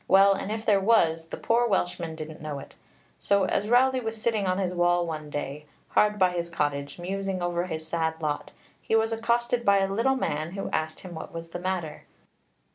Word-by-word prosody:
Well, 195 +1 +6
and 195 +1 -4
if 220 0 -4
there 205 -2 +4
was, 165 -6 +3
the - - -6
poor 240 +1 +2
Welshman 175 -5 -1
didn't 155 -1 -8
know 150 -2 -4
it. 140 - -10 0.5
So 200 -1 +2
as 200 +2 0
Rowli 260 +2 +4
was 225 -1 -4
sitting 215 -3 0
on 185 0 +1
his 185 -2 -1
wall 175 0 +2
one 155 -2 -5
day, 145 0 -5 0.2
hard 210 0 +3
by 185 -2 +4
his 170 -1 -3
cottage, 145 -3 -2
musing 195 +1 -3
over 175 0 -1
his 160 -2 -5
sad 160 -1 -1
lot, 150 -2 -2 0.3
he 225 - 0
was 225 0 +2
accosted 235 +1 0
by 200 -2 +5
a 195 0 +1
little 250 +6 +2
man 155 - -2
who 195 - -4
asked 155 0 -2
him 185 -2 -9
what 160 - -7
was 165 0 -7
the 175 - -5
matter. 180 -4 -3
180 Hz, 205 wpm, -27 LUFS, 160-210 Hz, 0.5 s, Well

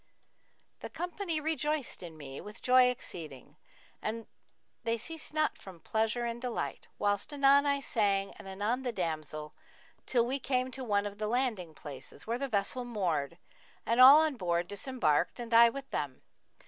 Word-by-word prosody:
The - - -7
company 350 0 -2
rejoiced 305 -2 -1
in 165 -3 -9
me 135 -2 -8
with 210 +2 -10
joy 255 0 +6
exceeding 155 - -7 0.5
and 225 +1 -3 0.6
the 230 0 0
ceased 320 +7 -4
not 310 0 0
from 185 -3 -11
pleasure 225 +6 0
and 235 0 -4
delight, 250 -2 -4
whilst 205 +3 0
anon 280 0 +5
I 280 0 +1
sang 200 -6 +1
and - - -10
anon 205 +6 -1
the 250 -2 -2
damsel, 155 -5 -4 0.5
till 240 -2 +3
we 265 +3 -1
came 255 -1 0
to 265 0 -6
one 205 -3 +1
of 205 0 -6
the 215 - -1
landing 220 -9 -1
places, 140 -4 -8
where 235 +2 -2
the 275 0 -2
vessel 215 +3 0
moored 170 -10 -2 0.5
and 235 +2 +3
all 270 +3 +11
on 310 -4 0
board 175 -3 0
disembarked 205 - 0
and 235 -1 -5
I 235 +1 +8
with 275 +3 -7
them. 140 -3 -3
230 Hz, 165 wpm, -31 LUFS, 190-260 Hz, 0.6 s, all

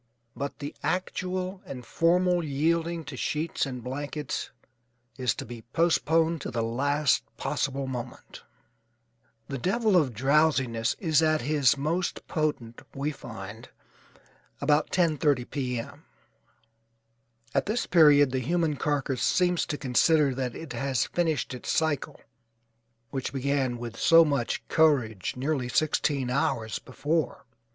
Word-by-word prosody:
But 140 +1 -4
the 145 0 -6
actual 185 +1 -2
and 130 -9 -8
formal 175 +4 +2
yielding 165 +3 0
to - - -8
sheets 155 -1 -1
and 125 -3 -6
blankets 145 +2 -4 0.7
is 125 -2 0
to - - -6
be 120 -1 -9
postponed 165 -1 +2
to - - -4
the 115 -1 -2
last 140 +4 +1 0.2
possible 135 0 -2
moment. 125 -2 -7 1.1
The 135 -2 -4
devil 215 - +1
of 140 -10 +2
drowsiness 130 -3 +2
is 160 -4 +2
at 155 -1 +2
his 145 0 +3
most 165 +6 -2
potent, 145 -7 -2
we 140 +2 -1
find, 110 -3 -9 0.9
about 145 +1 +2
10:30 150 -7 +1
P. 125 -4 -2
M. 115 - -9 1.5
At - - +1
this 225 +4 0
period 145 -5 +6
the 130 - 0
human 160 +2 0
carcass 140 -3 -1
seems 180 -1 +2
to 145 - -3
consider 145 +2 +3
that 125 -2 -3
it 160 -6 -7
has 130 -1 0
finished 160 -6 -1
its 125 - -7
cycle, 155 -4 -1 0.9
which 135 -2 -3
began 135 -2 0
with 115 -1 -7
so 165 0 +7
much 140 -6 -1
courage 130 - +2
nearly 130 -1 -1
sixteen 140 -2 +1
hours 115 -4 0
before. 150 +5 -2
145 Hz, 130 wpm, -27 LUFS, 125-160 Hz, 1.5 s, so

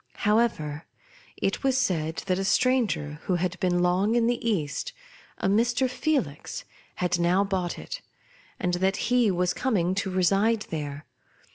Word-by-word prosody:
However, 205 -9 +1 0.5
it - - -1
was 265 -1 +2
said 165 -10 0
that 185 -1 0
a - - -1
stranger, 200 - +1
who 185 - +1
had 180 +1 -2
been 180 -2 +1
long 190 +5 +2
in 235 -1 +3
the 240 0 0
East, 200 - -2 0.4
a - - -1
Mr. 240 +6 +2
Felix, 250 - -2 0.3
had 175 -1 0
now 175 +3 +3
bought 190 -3 -2
it, - - -7 0.6
and 180 0 0
that 190 +2 +1 0.2
he 245 -3 +4
was 180 -1 +1
coming 190 -9 +1
to 195 0 -1
reside 195 +4 +2
there. 150 -2 -4
190 Hz, 150 wpm, -26 LUFS, 175-230 Hz, 0.6 s, he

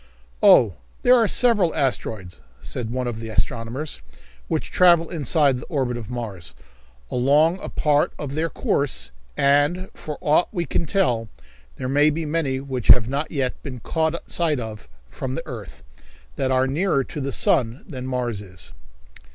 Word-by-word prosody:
"Oh, 105 -6 +6 0.3
there 250 - +7
are 230 -3 +4
several 210 -8 +3
asteroids," 110 - -2 0.2
said 110 - -5
one 125 +1 -2
of 120 -2 -4
the 115 0 -6
astronomers, 115 - -3 0.5
"which - - -2
travel 170 -2 +4
inside 145 -3 +2
the - - -9
orbit 130 -5 -1
of 115 -2 -7
Mars, 100 - -6 0.6
along 150 +8 +3
a - - -6
part 150 -1 +1
of 140 -2 -5
their 160 +3 -1
course, 125 - 0 0.3
and, 145 +7 +2
for 150 -1 -7
aught 150 +4 +3
we 175 -4 -2
can 165 - -2
tell, 120 - +1 0.5
there 130 - -4
may 145 +3 +4
be 160 +2 -2
many 150 -4 -1
which 130 -3 -5
have 115 -3 +7
not 140 +3 -2
yet 135 -4 -2
been 130 -3 -7
caught 160 +6 -2
sight 160 -5 +1
of 110 - -7 0.2
from 130 - -5
the 165 - -5
earth, 95 - -9 0.5
that 135 - -1
are 130 0 +3
nearer 140 +1 +1
to 145 - -6
the 140 +1 -2
sun 120 0 +1
than 130 -2 -6
Mars 120 -5 -2
is." 90 -9 -12
135 Hz, 165 wpm, -23 LUFS, 115-155 Hz, 0.6 s, there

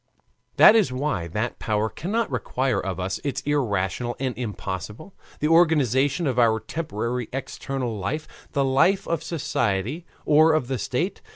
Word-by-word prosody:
That 220 - +8
is 215 - +3
why 130 - -2
that 105 +8 -3
Power 110 -1 0
cannot 210 - -2
require 125 -1 -1
of 95 -1 -4
us 95 +1 -2
what 140 -3 -3
is - - -1
irrational 120 -4 -1
and 130 -2 -2
impossible: 105 - -6 0.3
the 150 - +2
organization 150 -2 +3
of 130 -3 0
our 110 -2 +4
temporary 120 -4 -3
external 135 -2 -4
life, 155 +11 -3 0.3
the 140 -2 +2
life 170 +9 +3
of 170 -2 -1
society 140 - -2 0.2
or 155 +2 +5
of 135 -5 0
the 130 -2 -1
state. 160 - -2
130 Hz, 155 wpm, -24 LUFS, 110-155 Hz, 0.3 s, That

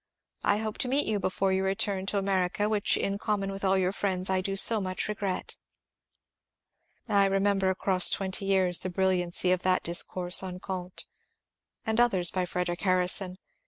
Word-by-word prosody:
I 205 - +2
hope 215 0 -4
to 255 - -1
meet 275 +3 +1
you 215 -2 -1
before 190 0 0
your 190 0 0
return 195 0 -1
to 205 - -1
America, 195 +1 0
which 210 -2 +1
in 200 0 -2
common 200 -2 -1
with 195 0 -7
all 190 0 +3
your 185 -1 +1
friends 190 -2 -1
I 185 0 +1
so 195 +3 +2
much 185 -1 -3
regret. 200 -3 -4 1.5
I 200 -3 +3
remember 195 0 +1
across 185 -1 +3
twenty 195 0 -2
years 190 -3 +2
the 185 - 0
brilliancy 180 -1 0
of 185 -1 +1
that 185 0 +1
dis 170 +1 0
course 180 -1 0
on 185 -1 -6
Comte, 185 -1 -6 0.8
and 220 +1 0
others 190 -8 +2
by 185 -1 -1
Frederic 180 -1 -3
Harrison. 185 0 +1
190 Hz, 170 wpm, -28 LUFS, 185-200 Hz, 1.5 s, all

